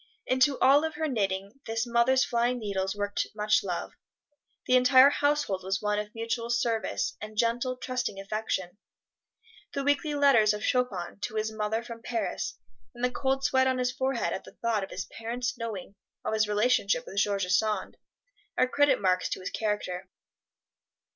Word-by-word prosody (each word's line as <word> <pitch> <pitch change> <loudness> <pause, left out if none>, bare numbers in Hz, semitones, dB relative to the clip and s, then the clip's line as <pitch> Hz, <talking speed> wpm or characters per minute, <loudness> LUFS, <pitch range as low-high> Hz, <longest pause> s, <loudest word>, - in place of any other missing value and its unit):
Into 260 +2 +3
all 275 +3 +5
of 320 -1 -2
her 315 +1 -1
knitting 200 -2 -2
this 225 +1 -1
mother's 240 +2 +3
flying 240 +1 +1
needles 195 -3 -2
worked 205 0 -2
much 210 0 +2
love. 180 -3 -4 0.7
The 255 - +3
entire 255 +2 +7
household 285 -11 +1
was 190 +1 -1
one 210 0 0
of 210 +1 -6
mutual 230 +1 -2
service, 230 - 0
and 215 0 -8
gentle, 240 +3 +1
trusting 250 -6 -3
affection. 195 -2 -3 1.0
The 275 - -1
weekly 290 +2 +1
letters 235 -7 +5
of 210 - -7
Chopin 205 -9 -1
to 215 - -5
his 220 0 -1
mother 220 +1 -2
from 230 -1 -9
Paris, 230 -1 -3 0.4
and 240 - -8
the 250 - 0
cold 270 +1 -1
sweat 260 -1 +3
on 260 0 +1
his 250 -1 0
forehead 260 -8 -1
at - - -4
the - - -15
thought 225 -3 +1
of 195 - -6
his 185 - -5
parents 245 +6 -4
knowing 220 -5 -6 0.3
of - - -1
his 215 -1 +2
relationship 220 +2 +2
with 195 - -9
George 200 -1 +1
Sand, 200 +2 0 0.6
are 255 - +4
credit 285 +2 +3
marks 185 -2 +1
to - - -3
his 185 - -5
character. 195 -4 -3
225 Hz, 170 wpm, -28 LUFS, 205-255 Hz, 1.0 s, entire